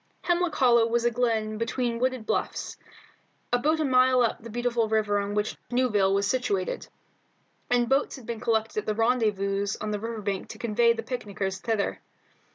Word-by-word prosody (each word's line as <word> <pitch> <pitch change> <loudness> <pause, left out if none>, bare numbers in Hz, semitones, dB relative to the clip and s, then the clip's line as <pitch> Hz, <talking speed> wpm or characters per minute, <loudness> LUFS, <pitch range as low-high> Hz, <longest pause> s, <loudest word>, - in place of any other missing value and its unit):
Hemlock 350 -1 +1
Hollow 235 -3 +4
was 235 +1 0
a 240 - +3
glen 220 -3 0
between 235 0 -1
wooded 255 -2 -1
bluffs, - - -2 0.8
about 300 +6 +2
a 310 - +1
mile 255 -1 +4
up 230 - -1
the 230 - -9
beautiful 235 -1 0
river 215 -2 +1
on 200 0 -3
which 210 0 -1
Newville 210 -6 +2
was 200 0 +1
situated, 200 -5 -1 0.8
and 245 -1 +2
boats 270 +4 +1
had 260 -5 -12
been 235 -1 -4
collected 220 -2 0
at 210 - -6
the 215 - 0
rendezvous 205 -4 +1
on 215 0 -3
the 210 - -2
river 225 0 -5
bank 195 -2 -2
to - - -8
convey 235 +1 +3
the 225 -1 -5
picnickers 200 -5 -4
thither. 220 -2 -1
230 Hz, 175 wpm, -27 LUFS, 210-245 Hz, 0.8 s, Hollow